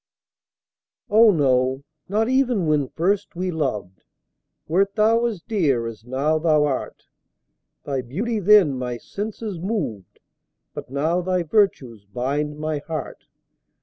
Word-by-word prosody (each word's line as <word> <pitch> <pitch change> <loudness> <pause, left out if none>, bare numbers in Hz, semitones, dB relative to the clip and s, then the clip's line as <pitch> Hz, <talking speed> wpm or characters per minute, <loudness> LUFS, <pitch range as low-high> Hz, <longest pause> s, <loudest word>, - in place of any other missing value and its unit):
Oh, 220 +2 +7
no 130 -5 +2 0.3
not 215 +3 +1
even 250 -7 +2
when 150 -3 +1
first 185 +8 -1
we 180 +1 -2
loved, 115 - -3 0.6
Wert 195 +5 +1
thou 225 +2 +3
as 210 -8 -5
dear 150 - +1
as 115 -1 -7
now 140 +6 0
thou 155 -2 +3
art; 135 -3 -3 0.8
Thy 135 -2 -2
beauty 205 - -3
then 200 -7 +5
my 125 -1 -3
senses 210 - -6
moved, 165 - -4 0.6
But - - -8
now 155 +6 0
thy 180 0 0
virtues 150 - 0
bind 140 +7 -2
my 155 -1 -2
heart. 155 -1 -7
155 Hz, 125 wpm, -22 LUFS, 135-200 Hz, 0.8 s, Oh